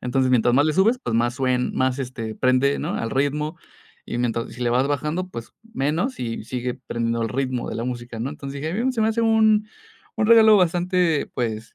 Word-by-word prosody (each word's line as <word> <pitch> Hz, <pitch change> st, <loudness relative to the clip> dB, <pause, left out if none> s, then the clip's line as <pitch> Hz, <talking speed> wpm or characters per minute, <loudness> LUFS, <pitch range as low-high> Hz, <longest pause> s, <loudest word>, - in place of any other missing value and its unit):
Entonces, 130 Hz, +1 st, 0 dB
mientras 120 Hz, -1 st, +3 dB
más 145 Hz, +3 st, +4 dB
le 155 Hz, -, +1 dB
subes, 215 Hz, +9 st, +3 dB
pues, 115 Hz, -, -2 dB
más 120 Hz, +1 st, +1 dB
suen 130 Hz, -1 st, 0 dB
más, 130 Hz, 0 st, 0 dB
este, 120 Hz, -4 st, -5 dB
prende, 130 Hz, +2 st, +2 dB
¿no?, -, -, -3 dB
al 115 Hz, -, -3 dB
ritmo. 150 Hz, +4 st, -1 dB, 0.5 s
Y -, -, -4 dB
mientras 115 Hz, -1 st, -2 dB
si 125 Hz, -, -7 dB
le 120 Hz, -, +1 dB
vas 130 Hz, +3 st, +2 dB
bajando, 150 Hz, +6 st, -2 dB
pues, 115 Hz, -8 st, -9 dB, 0.2 s
menos, 165 Hz, -, -1 dB
y 115 Hz, -3 st, -4 dB
sigue 125 Hz, +1 st, -3 dB
prendiendo 115 Hz, -2 st, -3 dB
el 115 Hz, -, -1 dB
ritmo 130 Hz, 0 st, -2 dB
de -, -, -4 dB
la 115 Hz, -, -3 dB
música, 120 Hz, -2 st, -5 dB
¿no? 130 Hz, +4 st, -2 dB
Entonces 140 Hz, -2 st, -7 dB
dije: 160 Hz, +4 st, -3 dB
"Mm, 260 Hz, -, +2 dB
se 230 Hz, -, -2 dB
me 220 Hz, -, +3 dB
hace 225 Hz, +1 st, 0 dB
un 220 Hz, -1 st, +3 dB, 0.5 s
un 215 Hz, -, +1 dB
regalo 220 Hz, -2 st, +7 dB
bastante, 175 Hz, -2 st, +1 dB
pues, 115 Hz, -2 st, -3 dB
135 Hz, 215 wpm, -23 LUFS, 120-175 Hz, 0.5 s, regalo